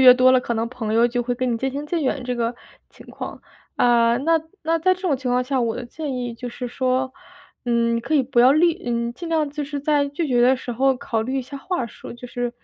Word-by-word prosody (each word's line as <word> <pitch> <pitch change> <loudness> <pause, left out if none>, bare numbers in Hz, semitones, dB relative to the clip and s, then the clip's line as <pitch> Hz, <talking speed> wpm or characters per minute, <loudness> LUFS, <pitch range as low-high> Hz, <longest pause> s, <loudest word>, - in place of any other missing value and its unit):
越 255 -1 +10
多 255 0 +5
了 255 - +5
可 240 - -2
能 225 0 0
朋 225 -4 -3
友 235 +1 +5
就 245 0 -1
会 245 +1 -1
跟 250 0 -1
你 230 - -1
渐 265 +3 -1
行 285 +2 -4
渐 330 0 -1
远 260 -1 -1
这 250 - -2
个 235 0 -1 0.3
情 - - -16
况， - - -7 0.4
啊， 235 -1 +4
那 320 +5 +2 0.2
那 330 +1 +1
在 370 +3 +3
这 370 - -15
种 350 -6 +2
情 255 -1 -3
况 250 0 +2
下， 265 0 0
我 230 -2 0
的 245 - -5
建 285 +3 -5
议 245 -1 -3
就 245 +2 -6
是 245 +1 -6
说， 255 +1 0 0.5
嗯， 235 -1 +2
你 - - -1
可 240 +7 -2
以 285 - +5
不 245 -1 +2
要 250 +2 +7
立 335 +3 +3
嗯， 235 0 -1
尽 335 +7 -7
量 315 -2 +1
就 295 +1 -4
是 290 0 -4
在 290 0 +1
拒 310 +4 -2
绝 245 -4 +2
的 255 +2 +5
时 250 -1 -6
候 265 +2 +2
考 225 -2 -2
虑 260 +5 -2
一 - - -2
下 275 +3 -8
话 270 -4 -2
术， - - -11
就 245 +1 -9
是， 245 0 -3
255 Hz, 290 characters per minute, -22 LUFS, 240-285 Hz, 0.5 s, 越